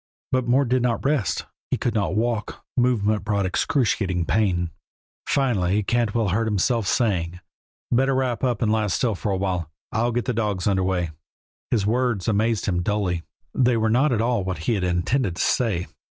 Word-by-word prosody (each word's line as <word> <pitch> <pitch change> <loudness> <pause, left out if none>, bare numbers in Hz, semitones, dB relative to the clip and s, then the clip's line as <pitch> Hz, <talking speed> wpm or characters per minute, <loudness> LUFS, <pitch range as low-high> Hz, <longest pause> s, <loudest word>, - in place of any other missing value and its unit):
But 130 -1 +1
Mort 130 +2 +3
did 130 0 +2
not 120 +1 0
rest. 130 - 0 0.2
He - - 0
could 120 - -1
not 100 -3 0
walk; 115 0 -2
movement 110 -4 +2
brought 100 -2 0
excruciating 95 - 0
pain. 90 -4 +1 0.6
Finally 105 -7 +1
Cantwell 115 -1 +1
heard 110 +5 +1
himself 110 +1 +1
saying: 90 -6 0 0.5
"Better 135 +2 +3
wrap 130 -2 -1
up 125 -3 +1
and 105 - +2
lie 110 -1 +1
still 110 +4 +1
for 100 +1 -3
a 95 - 0
while. 90 -4 -2 0.2
I'll 120 +2 +1
get 120 0 -1
the 125 - 0
dogs 105 -5 -1
underway." 95 -4 +1 0.6
His 110 -5 +1
words 120 -2 0
amazed 110 +1 +1
him 90 -3 0
dully. 95 -3 0 0.3
They 125 -2 +3
were 110 0 +1
not 135 +5 +3
at 115 -3 +1
all 115 -3 +1
what 95 -1 -3
he - - +2
had 100 -4 -1
intended 90 +4 0
to - - -3
say. 105 -8 +1
110 Hz, 180 wpm, -23 LUFS, 95-120 Hz, 0.6 s, Mort